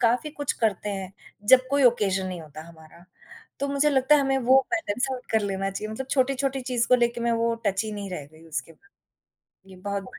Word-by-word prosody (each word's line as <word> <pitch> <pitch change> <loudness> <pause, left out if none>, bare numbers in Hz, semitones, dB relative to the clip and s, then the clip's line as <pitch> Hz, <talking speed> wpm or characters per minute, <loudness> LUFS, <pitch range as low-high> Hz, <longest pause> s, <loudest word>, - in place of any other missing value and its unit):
काफ़ी 245 +5 +2
कुछ 285 - 0
करते 210 -1 0
हैं, 190 0 -7 0.3
जब 255 +3 +6
कोई 280 0 +2
ऑकेजन 195 -5 -1
नहीं 180 -2 -5
होता 155 0 -10
हमारा, 165 +1 -16 0.6
तो 280 - -1
मुझे 280 +1 +2
लगता 265 +1 +4
है 295 - +5
हमें 270 -1 +1
वो 260 +1 +5
पैटर्न 225 -1 -2
सेट 260 -1 -5
कर 220 - +4
लेना 195 0 -2
चाहिए 215 +2 -5
मतलब 265 +4 -5
छोटी-छोटी 270 0 +1
चीज़ 245 -2 -1
को 250 - +6
लेके 235 0 +1
मैं 235 0 +1
वो 230 0 +1
टची 200 +2 0
नहीं 200 -2 -6
रह 150 -6 -5
गई 160 +1 -17
उसके 155 +1 -5
बाद, 400 - -27 0.8
ये 185 - -12
बहुत 200 +1 -4
बड़ - - -12
225 Hz, 220 wpm, -25 LUFS, 190-260 Hz, 0.8 s, जब